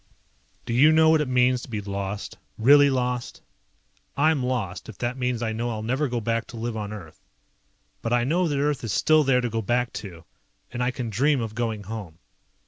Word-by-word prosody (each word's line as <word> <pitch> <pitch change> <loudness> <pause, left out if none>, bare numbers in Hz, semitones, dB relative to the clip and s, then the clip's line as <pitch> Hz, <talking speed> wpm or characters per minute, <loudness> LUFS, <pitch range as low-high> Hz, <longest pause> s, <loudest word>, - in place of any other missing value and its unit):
Do 115 - -3
you 145 +6 +6
know 160 0 +5
what 160 -1 +4
it 150 - -1
means 125 0 +2
to - - -10
be 110 -3 -3
lost? 100 0 -5 0.2
Really 145 +5 +6
lost? 125 -2 -2 0.7
I'm 155 0 +3
lost, 120 -8 -3
if 110 - -10
that 120 +1 -2
means 125 -2 -2
I 110 -1 -1
know 120 +2 -2
I'll 110 -2 -4
never 130 +6 0
go 120 -1 -2
back 115 0 -2
to 115 - -10
live 115 0 -3
on 105 -1 -4
Earth. 90 -7 -10 0.8
But 115 - -3
I 120 0 +3
know 170 +7 +1
that 145 -3 -1
Earth 145 -1 0
is 115 - -3
still 155 +8 +4
there 130 -2 +3
to 120 - -1
go 115 0 -1
back 120 +3 0
to, 85 -5 -10 0.5
and 120 - -4
I 125 - +1
can 125 -2 -4
dream 140 +6 +2
of 115 -2 -4
going 110 -2 -3
home. 100 -6 -7
120 Hz, 215 wpm, -25 LUFS, 110-130 Hz, 0.8 s, you